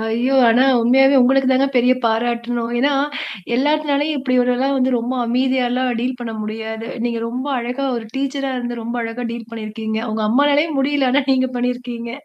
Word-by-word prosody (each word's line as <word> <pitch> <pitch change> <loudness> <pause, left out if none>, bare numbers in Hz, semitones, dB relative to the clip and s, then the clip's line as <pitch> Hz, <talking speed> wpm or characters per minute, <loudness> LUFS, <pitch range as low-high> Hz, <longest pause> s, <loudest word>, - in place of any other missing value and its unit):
ஐயோ! 235 +4 0
ஆனா 245 +3 +4 0.2
உண்மையாவே 270 +4 +4
உங்களுக்கு 265 +1 +3
தாங்க 265 +1 +3
பெரிய 250 +1 +4
பாராட்டணும். 235 +1 -1
ஏன்னா, 280 +3 +2 0.6
எல்லாத்துனாலயும் 295 +1 +1
இப்படி 260 -1 -1
ஒருல்லாம் 255 +3 +1
வந்து 260 0 +1
ரொம்ப 240 +3 -3
அமைதியாலாம் 255 +1 0
டீல் 250 +1 -2
பண்ண 225 -2 -5
முடியாது. 220 +1 -5 0.2
நீங்க 230 -1 -2
ரொம்ப 255 +4 -4
அழகா 250 +3 -3
ஒரு 225 -1 -6
டீச்சரா 275 0 -2
இருந்து 240 -1 -4
ரொம்ப 235 +2 -4
அழகா 230 +2 -5
டீல் 230 -1 -8
பண்ணியிருக்கீங்க. 220 0 -4
அவுங்க 220 0 -2
அம்மானாலேயே 290 +6 +3
முடியல 275 -1 +1
ஆனா 280 +3 +3
நீங்க 260 0 +1
பண்ணியிருக்கீங்க. 245 -1 -3
245 Hz, 160 wpm, -19 LUFS, 235-270 Hz, 0.6 s, ஆனா